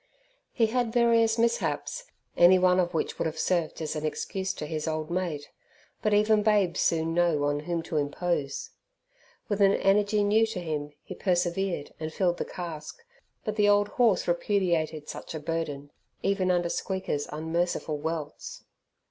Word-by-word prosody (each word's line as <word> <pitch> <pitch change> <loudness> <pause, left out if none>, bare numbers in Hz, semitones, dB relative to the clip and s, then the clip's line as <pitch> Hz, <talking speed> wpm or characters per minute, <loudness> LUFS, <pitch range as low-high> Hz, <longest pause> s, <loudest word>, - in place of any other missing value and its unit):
He 230 - +2
had 235 +1 0
various 230 -1 +3
mishaps, 235 - 0 0.3
any 175 +2 +7
one 180 0 +4
of 175 -1 +1
which 155 - -2
would - - +1
have 160 0 -5
served 165 -1 0
as 155 - -3
an 155 - -3
excuse 190 +4 -2
to - - -5
his 155 +1 -4
old 155 0 -2
mate, 170 -5 -3 0.5
but 215 - +1
even 210 +1 +4
babes 205 -6 +2
soon 165 0 +1
know 170 -4 +2
on 145 0 +1
whom 165 +2 -3
to 160 - -3
impose. 145 -1 -2 0.8
With 205 -1 -1
an 195 0 +6
energy 205 +1 +2
new 220 +2 +3
to 220 -4 -4
him 150 -4 -4
he - - -7
persevered 180 -3 -1
and 155 0 -4
filled 175 +1 +1
the - - -2
cask, 165 -4 -7 0.5
but 215 0 -3
the 205 -1 +4
old 205 0 +4
horse 235 -6 +2
repudiated 170 -4 0
such - - -7
a - - -3
burden 150 -3 -4 0.3
even 195 -2 +1
under 175 -1 +2
Squeaker's 190 -6 -2
unmerciful 160 0 -2
welts. 160 -1 -5
175 Hz, 165 wpm, -28 LUFS, 155-205 Hz, 0.8 s, any